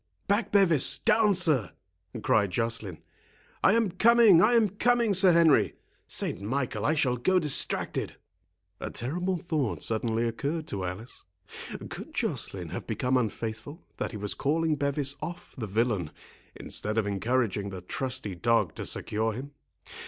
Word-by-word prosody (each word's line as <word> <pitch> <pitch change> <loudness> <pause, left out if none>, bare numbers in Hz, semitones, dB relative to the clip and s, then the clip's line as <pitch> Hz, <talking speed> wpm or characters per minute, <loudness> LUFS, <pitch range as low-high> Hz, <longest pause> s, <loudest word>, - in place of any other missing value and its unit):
"Back, 205 +1 0
Bevis; 170 -8 +4
down, 215 -2 +3
sir!" 150 - +2 0.5
cried 100 -3 +2
Joceline. 110 -4 -3 0.6
"I - - +5
am 225 -4 +1
coming, 225 -4 +6
I 220 +6 +4
am 225 -3 +4
coming, 235 +1 +1
Sir 190 0 +6
Henry—Saint 165 - +1
Michael, 130 +5 -2
I 155 - +2
shall 125 -4 +1
go 185 +10 +2
distracted!" 150 -6 +1 0.6
A - - -5
terrible 180 +9 -2
thought 155 - -2
suddenly 115 +1 -1
occurred 145 +7 -3
to 95 -2 -3
Alice; 100 +7 -7 0.6
could - - -9
Joceline - - -2
have - - -7
become 125 +1 -1
unfaithful, 115 - -3
that - - -3
he 110 - -7
was 105 0 0
calling 155 +2 0
Bevis 140 -1 -1
off 175 0 -7
the 115 -5 -5
villain, 105 -5 0 0.5
instead 110 +1 -4
of 110 - +1
encouraging 100 0 -1
the 95 -2 -7
trusty 130 +1 -3
dog 100 -1 +1
to - - -4
secure 110 +1 -1
him? 135 +5 -7
130 Hz, 145 wpm, -27 LUFS, 110-175 Hz, 0.6 s, coming